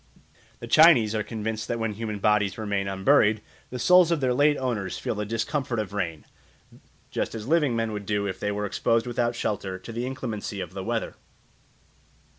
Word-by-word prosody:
The - - -7
Chinese 150 -10 +6
are 110 - 0
convinced 110 0 -4
that 120 - -2
when 115 -2 -2
human 110 0 -4
bodies 105 -1 +1
remain 100 -3 -2
unburied, 105 +2 +3 0.3
the 125 - -5
souls 180 +6 +5
of 170 -2 +1
their 130 -2 +1
late 145 +3 +3
owners 115 -8 -2
feel - - -3
the 105 -1 -4
discomfort 120 +3 -2
of 105 -2 -3
rain, 85 -7 -3 0.9
just - - -2
as 110 -1 -6
living 150 -5 +2
men 115 -1 -1
would 105 -2 -6
do 105 -1 0
if 95 - -4
they 105 - -1
were 105 0 -2
exposed 115 +3 +1
without 120 -1 -1
shelter 100 -4 -3
to 95 +5 -10
the 120 +2 -3
inclemency 110 -6 -5
of 90 -2 -6
the 95 -1 -5
weather. - - -3
110 Hz, 190 wpm, -26 LUFS, 105-125 Hz, 0.9 s, Chinese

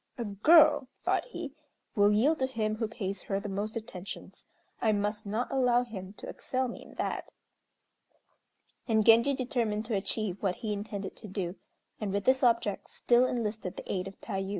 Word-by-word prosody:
"A 235 - -3
girl," 290 - +6 0.2
thought - - +2
he, 345 - -6 0.4
"will 205 -1 +5
yield 275 +10 +3
to 260 - +2
him 215 -4 -1
who 225 -1 -1
pays 200 -4 -4
her 195 -1 -2
the 210 - -6
most 205 +3 -3
attentions. 195 -4 -7 0.3
I 220 -2 +3
must 210 +1 -1
not 220 +5 -2
allow 250 -2 +3
him 195 -5 -8
to - - -9
excel 260 0 -2
me 240 - -7
in - - -14
that." - - -3 1.6
And 220 -3 +3
Genji 235 +5 +6
determined 235 -4 -1
to 220 -1 -1
achieve 195 0 -2
what 190 -3 +1
he 210 - 0
intended 200 -1 -5
to 220 - -9
do, 185 -2 -3 0.4
and 210 -3 -2
with 200 0 -1
this 260 +3 +4
object 230 -5 +2
still 245 +1 +3
enlisted 215 -6 -3
the - - -5
aid 185 0 -2
of 195 - -10
Tayû. 195 -3 -3
215 Hz, 180 wpm, -30 LUFS, 200-245 Hz, 1.6 s, girl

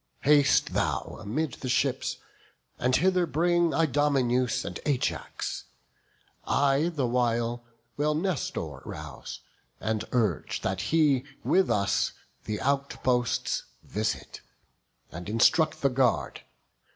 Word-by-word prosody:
Haste 145 -1 +4
thou - - -1
amid 125 +7 -2
the 130 - -3
ships, - - 0 0.6
and 125 +1 +2
hither 185 -1 +3
bring 170 +1 +2
Idomeneus 135 -5 +1
and 90 - -5
Ajax; 140 -4 -2 0.8
I 140 +3 +2
the 150 -7 -1
while 120 -1 0 0.3
Will 150 +1 +1
Nestor 170 -2 -2
rouse, - - -8 0.4
and 110 -1 -1
urge 110 - 0
that 95 0 -1
he 150 -5 +3 0.2
with 190 0 +3
us 100 -1 +1 0.3
The 105 -1 -3
outposts 130 -3 0 0.2
visit, 110 +1 -3 0.7
and 85 +4 -7
instruct 150 +9 +3
the 140 - +5
guard. 125 -1 +1
135 Hz, 105 wpm, -28 LUFS, 120-150 Hz, 0.8 s, the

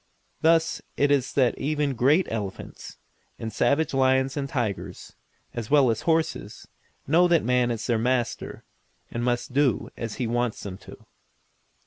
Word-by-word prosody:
Thus 165 0 +3 0.2
it 145 0 +3
is 135 -2 +2
that 130 -4 +3
even 145 0 0
great 145 +9 +3
elephants, 105 -4 -6 0.4
and 110 -1 -6
savage 145 +6 +1
lions 130 0 +2
and 140 -2 -3
tigers, 120 - -4 0.4
as 115 -3 -5
well 140 -4 +5
as 110 - -3
horses, 160 0 -1 0.4
know 170 +5 +4
that 170 -2 +3
man 125 0 +2
is 115 -1 -3
their 115 -2 +1
master, 120 0 -1 0.5
and 120 - -3
must 120 +1 -1
do 135 -5 +1
as 115 -2 -5
he 125 - -2
wants 120 0 -1
them 95 -1 -7
to. - - -14
130 Hz, 150 wpm, -25 LUFS, 115-145 Hz, 0.5 s, well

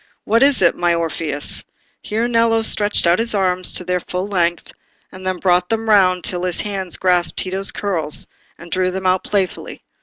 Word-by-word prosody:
What 225 +2 +1
is 275 -7 +5
it, 170 - +4
my 175 -1 +1
Orpheus?" 160 -3 -2 0.4
here 225 +2 -2
Nello 230 -1 +2
stretched 205 -3 +3
out 170 +3 +3
his 230 -1 -1
arms 185 -2 0
to - - -3
their 180 0 -1
full 180 +2 -5
length, 175 -4 -1 0.4
and 185 0 -9
then 185 -1 -1
brought 180 -1 +1
them 225 0 -2
round 185 -4 +3
till 180 -1 0
his 180 -1 -1
hands 195 -4 -4
grasped 180 -2 +3
Tito's 190 +1 -2
curls, 165 -7 -2 0.3
and 170 0 -13
drew 185 0 +1
them 190 +1 -5
out 185 0 +2
playfully. 195 -4 -3
185 Hz, 185 wpm, -18 LUFS, 175-205 Hz, 0.4 s, is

